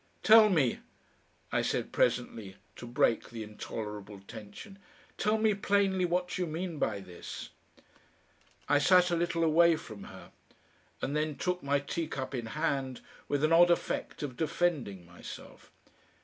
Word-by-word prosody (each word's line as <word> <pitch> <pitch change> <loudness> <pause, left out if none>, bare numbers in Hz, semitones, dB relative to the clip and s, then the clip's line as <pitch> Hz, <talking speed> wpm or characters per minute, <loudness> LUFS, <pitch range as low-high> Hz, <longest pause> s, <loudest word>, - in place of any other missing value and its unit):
"Tell 215 0 +8
me," 150 - +2 0.7
I - - +2
said - - -1
presently, 115 -5 0 0.2
to 120 - -8
break 120 -1 +1
the 115 -1 -6
intolerable 105 -1 -7
tension, 110 - -11 0.4
"tell 215 +1 +1
me 220 -1 +3
plainly 195 -2 +2
what 180 +1 -1
you 180 - 0
mean 165 0 -4
by 105 -6 -1
this." 90 -2 -8 1.2
I 145 - +4
sat 180 +3 +5
a - - +2
little 170 0 0
away 165 +1 +5
from 110 -9 -9
her, - - -12 0.7
and 140 - -1
then 150 -1 0
took 180 +3 -2
my 140 +1 +1
teacup 140 -1 -4
in 120 -3 -3
hand, 130 +2 -2 0.3
with 145 0 0
an 155 +1 +4
odd 175 +1 +7
effect 170 - -1
of 135 -4 -4
defending 150 - -1
myself. 85 0 -11
150 Hz, 145 wpm, -31 LUFS, 115-175 Hz, 1.2 s, Tell